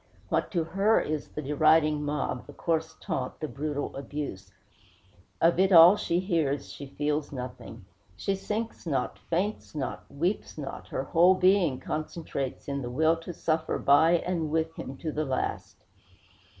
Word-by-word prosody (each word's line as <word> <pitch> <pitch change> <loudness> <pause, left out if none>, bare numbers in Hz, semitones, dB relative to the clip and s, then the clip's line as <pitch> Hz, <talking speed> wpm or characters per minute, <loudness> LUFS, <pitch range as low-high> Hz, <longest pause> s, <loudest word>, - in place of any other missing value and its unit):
What - - 0
to 170 -3 +1
her 195 +6 +2
is 155 -1 -3
the 150 - -6
deriding 150 +1 +3
mob, 145 -4 -2
the - - -11
coarse 160 -1 -1
taunt, 130 -1 -4
the 155 - -3
brutal 145 0 -4
abuse? 135 -9 -6 0.9
Of 170 +1 +3
it 190 +1 +4
all 175 +2 +9
she 175 -4 0
hears, 160 -7 -1
she 140 - -8
feels 145 +1 -2
nothing. 125 -5 -8 0.3
She 195 - -1
sinks 210 +1 -4
not, 135 -5 -1
faints 185 +1 -3
not, 135 -4 -5
weeps 175 +7 -2
not; 145 -3 -6
her 130 - -3
whole 175 +6 +5
being 185 -7 +3
concentrates 155 -4 -4
in 140 -1 -2
the 120 - -4
will 160 +6 +3
to 165 +2 -7
suffer 160 -1 -1
by 160 +4 +5
and 170 -2 0
with 160 +1 0
him 135 - -7
to 160 - -4
the 155 +1 -1
last. 135 -3 -3
155 Hz, 160 wpm, -28 LUFS, 140-170 Hz, 0.9 s, all